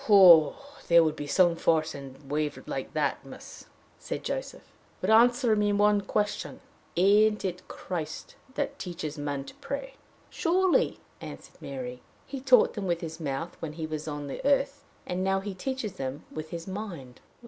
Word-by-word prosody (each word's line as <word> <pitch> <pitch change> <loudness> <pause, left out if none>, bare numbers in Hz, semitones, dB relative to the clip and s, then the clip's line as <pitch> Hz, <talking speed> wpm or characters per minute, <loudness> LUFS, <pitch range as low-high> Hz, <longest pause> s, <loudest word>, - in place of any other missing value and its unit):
"There 170 -1 +7
would 155 -1 0
be 145 - -6
some 175 +2 +4
force 160 -1 +1
in 135 -2 -9
a 140 - -19
wave 150 -1 -1
like - - -5
that, - - 0
miss!" - - -11 0.3
said - - -5
Joseph. - - -4 0.4
"But - - 0
answer 240 +1 +5
me 210 0 +2
one 205 0 +4
question: 205 +1 -2 0.4
Ain't 210 +3 +4
it 180 -1 -4
Christ 160 -4 -6 0.2
that 280 -1 -2
teaches 160 -4 -5
men 145 -1 -3
to - - -10
pray?" 275 -1 -5 0.4
"Surely," 370 +2 +2 0.2
answered - - -10
Mary. 125 -2 -6 0.2
"He 270 -1 -6
taught 255 -3 +5
them 200 -2 -4
with 170 -1 0
his 160 0 -6
mouth 155 +2 -4
when 155 -2 -5
he 160 0 -4
was 155 0 -5
on 145 -1 -4
the 140 - -6
earth; 280 0 +1 0.2
and 180 +1 -2
now 195 0 +2
he 195 0 -5
teaches 230 +2 -4
them 135 +2 -4
with 155 0 -6
his 170 +1 -6
mind." 180 - -7
180 Hz, 170 wpm, -28 LUFS, 155-215 Hz, 0.4 s, There